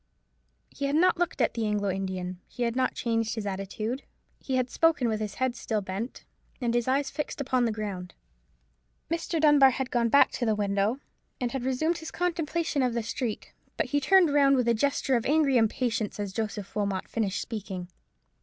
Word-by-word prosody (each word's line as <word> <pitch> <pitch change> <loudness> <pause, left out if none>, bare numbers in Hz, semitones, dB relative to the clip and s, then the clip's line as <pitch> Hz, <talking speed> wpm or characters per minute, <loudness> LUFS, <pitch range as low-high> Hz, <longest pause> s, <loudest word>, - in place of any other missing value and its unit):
He 280 - -4
had 280 +1 0
not 360 +3 +4
looked 350 -6 0
at 235 - +2
the 230 -2 -1
Anglo 205 -2 0
Indian; 185 -1 -4
he 245 - -4
had 235 0 0
not 255 0 +1
changed 225 -2 -1
his 220 -2 -4
attitude; 205 +6 -3 0.4
he 265 - -3
had 255 -1 0
spoken 325 -7 +3
with 220 -1 0
his 210 -2 -4
head 260 -1 0
still 220 -2 -2
bent, 195 +6 -5 0.3
and 240 -3 0
his 240 0 +1
eyes 270 +2 +1
fixed 300 - -4
upon 255 -3 +1
the 230 - +1
ground. 200 -4 -5 1.0
Mr. 335 0 -1
Dunbar 295 -3 +7
had 260 0 -3
gone 235 -1 +2
back 280 - +6
to - - -4
the 215 - +2
window, 205 +3 0 0.4
and 245 -3 -1
had 265 -1 -3
resumed 315 +7 0
his 320 - -7
contemplation 330 -3 -1
of 250 -2 +1
the 235 - -1
street; 230 0 -4 0.2
but - - -1
he 290 - +3
turned 355 0 +5
round 275 -1 +5
with 250 -2 +1
a 235 - +5
gesture 270 +2 +1
of 235 - 0
angry 295 -2 +3
impatience 225 -2 +1
as 200 -2 -3
Joseph 210 -2 -4
Wilmot 200 -3 -1
finished 205 -4 -1
speaking. 195 -5 -5
240 Hz, 195 wpm, -28 LUFS, 210-275 Hz, 1.0 s, Dunbar